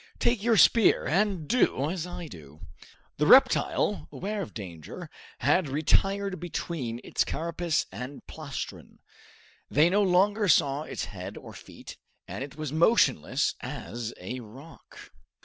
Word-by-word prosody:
Take 235 Hz, -3 st, +1 dB
your 230 Hz, 0 st, +3 dB
spear 230 Hz, +1 st, +5 dB
and 190 Hz, -2 st, 0 dB
do 160 Hz, -, +2 dB
as 180 Hz, -2 st, -4 dB
I 175 Hz, -1 st, -7 dB
do." 75 Hz, -, -13 dB, 0.6 s
The -, -, +1 dB
reptile, 75 Hz, -, +4 dB
aware 205 Hz, +2 st, -4 dB
of 180 Hz, -, -6 dB
danger, 85 Hz, -7 st, -8 dB, 0.3 s
had 145 Hz, +5 st, +2 dB
retired 195 Hz, +7 st, +1 dB
between 155 Hz, -8 st, -4 dB
its -, -, 0 dB
carapace 170 Hz, 0 st, -2 dB
and 125 Hz, +8 st, -8 dB
plastron. 155 Hz, -4 st, -7 dB, 0.7 s
They 155 Hz, +4 st, +4 dB
no 205 Hz, +2 st, +3 dB
longer 200 Hz, +3 st, +3 dB
saw 145 Hz, -3 st, +3 dB
its -, -, -5 dB
head -, -, -8 dB
or -, -, -11 dB
feet, -, -, -12 dB, 0.3 s
and -, -, -5 dB
it 140 Hz, +1 st, -9 dB
was 155 Hz, -2 st, -5 dB
motionless 160 Hz, -, +3 dB
as 120 Hz, -1 st, -6 dB
a 110 Hz, +8 st, -6 dB
rock. 130 Hz, +8 st, -14 dB
160 Hz, 135 wpm, -27 LUFS, 130-190 Hz, 0.7 s, spear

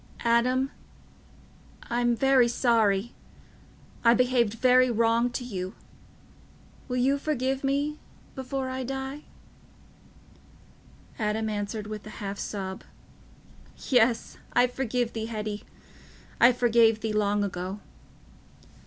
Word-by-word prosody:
"Adam... 250 Hz, +3 st, +2 dB, 1.1 s
I'm 240 Hz, 0 st, 0 dB
very 265 Hz, 0 st, +4 dB
sorry... 230 Hz, -3 st, +2 dB, 0.9 s
I 235 Hz, 0 st, +6 dB
behaved 245 Hz, -3 st, +2 dB
very 255 Hz, +1 st, +4 dB
wrong 230 Hz, +1 st, +2 dB
to 245 Hz, +1 st, -4 dB
you... 190 Hz, -4 st, -5 dB, 1.1 s
will 250 Hz, -2 st, -2 dB
you 270 Hz, +3 st, +2 dB
forgive 270 Hz, -2 st, -1 dB
me... 285 Hz, +2 st, 0 dB, 0.3 s
before 265 Hz, 0 st, -4 dB
I 260 Hz, 0 st, -4 dB
die?" 270 Hz, +3 st, -5 dB, 1.9 s
Adam 220 Hz, 0 st, -1 dB
answered 210 Hz, 0 st, -3 dB
with 215 Hz, -1 st, -6 dB
a 215 Hz, -, -10 dB
half 200 Hz, 0 st, -5 dB
sob, 190 Hz, -2 st, -5 dB, 1.1 s
"Yes, 240 Hz, -2 st, +2 dB
I 245 Hz, -, +5 dB
forgive 245 Hz, -1 st, -2 dB
thee 225 Hz, -1 st, -4 dB
Hetty. 215 Hz, -2 st, -5 dB, 0.7 s
I 240 Hz, -, +7 dB
forgave 230 Hz, -2 st, +3 dB
thee 220 Hz, -1 st, -2 dB
long 205 Hz, -1 st, +1 dB
ago." 185 Hz, +1 st, -4 dB
235 Hz, 105 wpm, -27 LUFS, 215-255 Hz, 1.9 s, I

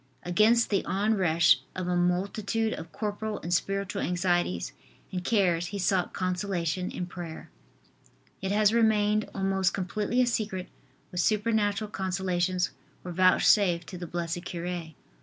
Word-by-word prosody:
Against 215 Hz, +7 st, +3 dB
the 200 Hz, -, +2 dB
onrush 185 Hz, -7 st, +3 dB, 0.2 s
of 185 Hz, -1 st, -3 dB
a 180 Hz, -, +1 dB
multitude 200 Hz, +5 st, 0 dB
of 165 Hz, -, -8 dB
corporal 210 Hz, +3 st, -3 dB
and 175 Hz, -, -2 dB
spiritual 195 Hz, +2 st, -1 dB
anxieties 175 Hz, -, 0 dB, 0.4 s
and 180 Hz, -1 st, -3 dB
cares 180 Hz, -5 st, +2 dB
he 200 Hz, -, -5 dB
sought 190 Hz, -2 st, +1 dB
consolation 185 Hz, -1 st, -2 dB
in 180 Hz, -, -4 dB
prayer. 175 Hz, -2 st, -8 dB, 0.9 s
It 190 Hz, 0 st, -2 dB
has 210 Hz, +1 st, +4 dB
remained 215 Hz, -2 st, +2 dB
almost 190 Hz, -2 st, +1 dB
completely 205 Hz, +5 st, -1 dB
a 250 Hz, -, +5 dB
secret 210 Hz, -6 st, -2 dB, 0.4 s
what 180 Hz, -, -4 dB
supernatural 210 Hz, 0 st, +1 dB
consolations 185 Hz, -2 st, -1 dB, 0.3 s
were 180 Hz, -, -6 dB
vouchsafed 185 Hz, 0 st, +4 dB
to 180 Hz, -, -7 dB
the 175 Hz, -, -6 dB
blessed 170 Hz, 0 st, -3 dB
cure. 175 Hz, -1 st, -4 dB
185 Hz, 135 wpm, -28 LUFS, 175-210 Hz, 0.9 s, a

